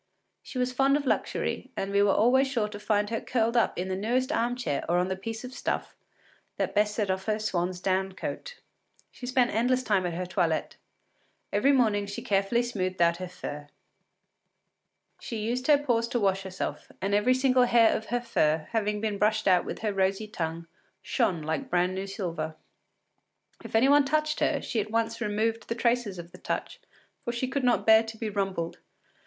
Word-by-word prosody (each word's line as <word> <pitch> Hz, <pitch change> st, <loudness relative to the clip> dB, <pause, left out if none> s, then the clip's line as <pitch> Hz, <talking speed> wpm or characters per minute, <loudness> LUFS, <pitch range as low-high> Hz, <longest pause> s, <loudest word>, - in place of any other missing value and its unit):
She -, -, -9 dB
was 250 Hz, 0 st, 0 dB
fond 275 Hz, +2 st, +3 dB
of 290 Hz, -, -4 dB
luxury, -, -, -1 dB
and 195 Hz, -, -2 dB
we 200 Hz, 0 st, +3 dB
were 205 Hz, -1 st, +4 dB
always 250 Hz, +7 st, +4 dB
sure 235 Hz, -6 st, 0 dB
to 205 Hz, -1 st, -8 dB
find 210 Hz, 0 st, 0 dB
her 225 Hz, -, -1 dB
curled 235 Hz, -1 st, 0 dB
up 235 Hz, -, +2 dB
in 180 Hz, +2 st, -2 dB
the 190 Hz, -, -2 dB
newest 245 Hz, +7 st, 0 dB
arm 245 Hz, -5 st, 0 dB
chair 220 Hz, -, -2 dB
or 175 Hz, -, +3 dB
on 180 Hz, +1 st, +1 dB
the 190 Hz, -, -1 dB
piece 220 Hz, +4 st, -6 dB
of 250 Hz, +1 st, -8 dB
stuff -, -, -3 dB, 0.6 s
that -, -, -1 dB
best 210 Hz, 0 st, +2 dB
set 205 Hz, -4 st, 0 dB
off 190 Hz, 0 st, -3 dB
her 215 Hz, -1 st, +1 dB
swan’s 180 Hz, -4 st, -2 dB
down 190 Hz, +1 st, 0 dB
coat. -, -, -6 dB, 0.5 s
She 245 Hz, -, -9 dB
spent 250 Hz, -1 st, +2 dB
endless 250 Hz, +3 st, +1 dB
time 195 Hz, -6 st, +1 dB
at 170 Hz, -, -4 dB
her 180 Hz, +1 st, -3 dB
toilet; 175 Hz, -3 st, -1 dB, 0.8 s
every 210 Hz, +8 st, +4 dB
morning 215 Hz, -6 st, +2 dB
she 200 Hz, -, -6 dB
carefully 200 Hz, +4 st, +1 dB
smoothed 185 Hz, -6 st, -3 dB
out 170 Hz, 0 st, +4 dB
her 185 Hz, 0 st, -5 dB
fur. 150 Hz, -5 st, -7 dB, 1.5 s
She 230 Hz, -, -5 dB
used 240 Hz, +4 st, -2 dB
her 295 Hz, -2 st, +7 dB
paws 240 Hz, -5 st, 0 dB
to 240 Hz, 0 st, -1 dB
wash 195 Hz, -2 st, +1 dB
herself, 190 Hz, -1 st, -5 dB
and 195 Hz, +1 st, -1 dB
every 220 Hz, +5 st, +4 dB
single 255 Hz, -1 st, +4 dB
hair 235 Hz, -2 st, +5 dB
of 220 Hz, -, -4 dB
her 245 Hz, 0 st, -1 dB
fur, 155 Hz, -9 st, +1 dB
having 210 Hz, -2 st, 0 dB
been 210 Hz, -2 st, -2 dB
brushed 215 Hz, 0 st, +2 dB
out 180 Hz, -2 st, +4 dB
with -, -, -6 dB
her 210 Hz, -2 st, 0 dB
rosy 195 Hz, +2 st, 0 dB
tongue, 165 Hz, -4 st, -4 dB, 0.4 s
shone 170 Hz, -4 st, 0 dB
like 155 Hz, -1 st, -3 dB
brand 180 Hz, +1 st, +2 dB
new 190 Hz, +1 st, -4 dB
silver. 165 Hz, -5 st, -4 dB, 1.1 s
If -, -, -7 dB
any 230 Hz, +4 st, +5 dB
one 285 Hz, 0 st, +5 dB
touched 305 Hz, +2 st, 0 dB
her, -, -, +1 dB
she 230 Hz, -4 st, -1 dB
at 210 Hz, -, -6 dB
once 230 Hz, +1 st, -1 dB
removed 225 Hz, +1 st, -1 dB
the 230 Hz, -, -2 dB
traces 235 Hz, -4 st, 0 dB
of 170 Hz, 0 st, -9 dB
the -, -, -13 dB
touch, -, -, -4 dB, 0.4 s
for 240 Hz, -, -2 dB
she 235 Hz, +2 st, -2 dB
could 270 Hz, +1 st, -2 dB
not 245 Hz, -1 st, +2 dB
bear 220 Hz, 0 st, +7 dB
to 225 Hz, 0 st, -8 dB
be 220 Hz, -1 st, -3 dB
rumpled. 195 Hz, -4 st, -2 dB
215 Hz, 200 wpm, -28 LUFS, 190-240 Hz, 1.5 s, her